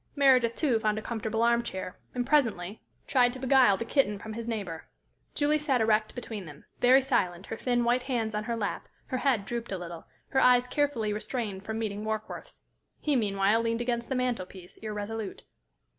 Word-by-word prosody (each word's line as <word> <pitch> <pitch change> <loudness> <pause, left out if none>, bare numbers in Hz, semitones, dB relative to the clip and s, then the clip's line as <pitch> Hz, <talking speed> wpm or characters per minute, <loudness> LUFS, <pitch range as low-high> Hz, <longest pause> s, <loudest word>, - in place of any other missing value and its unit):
Meredith, 255 -5 +4
too, 260 -8 +2
found 215 -1 0
a - - -2
comfortable 225 -1 -1
arm 235 0 +4
chair, 190 -5 -5 0.2
and 245 -1 0
presently 220 -9 +1 0.2
tried 245 -2 +3
to - - -7
beguile 255 -6 +5
the 230 - -4
kitten 230 -6 +2
from 220 +2 -7
his 230 +1 -6
neighbor. 195 -8 -4 0.5
Julie 300 +1 +2
sat 275 -4 +1
erect 215 -1 +2
between 220 -5 -6
them, 145 -2 -12
very 260 +2 +6
silent, 185 -9 0
her - - -5
thin, 240 +1 0
white 240 +2 +2
hands 235 -4 -2
on 210 0 -2
her 235 - -1
lap, 210 -3 -3 0.2
her 255 - -1
head 245 -8 +1
drooped 235 0 -4
a 190 - -1
little, 170 -2 -8 0.2
her 265 - +2
eyes 250 -1 +5
carefully 250 -6 0
restrained 210 -3 -3
from 220 +1 -4
meeting 210 -2 -3
Warkworth's. 215 0 -5 0.4
He 295 -2 +1
meanwhile 205 -1 +2
leaned 230 0 0
against 240 -1 -2
the 265 - 0
mantel 245 -7 -1
piece, 185 -2 -13
irresolute. 215 -1 -5
230 Hz, 190 wpm, -29 LUFS, 210-250 Hz, 0.5 s, very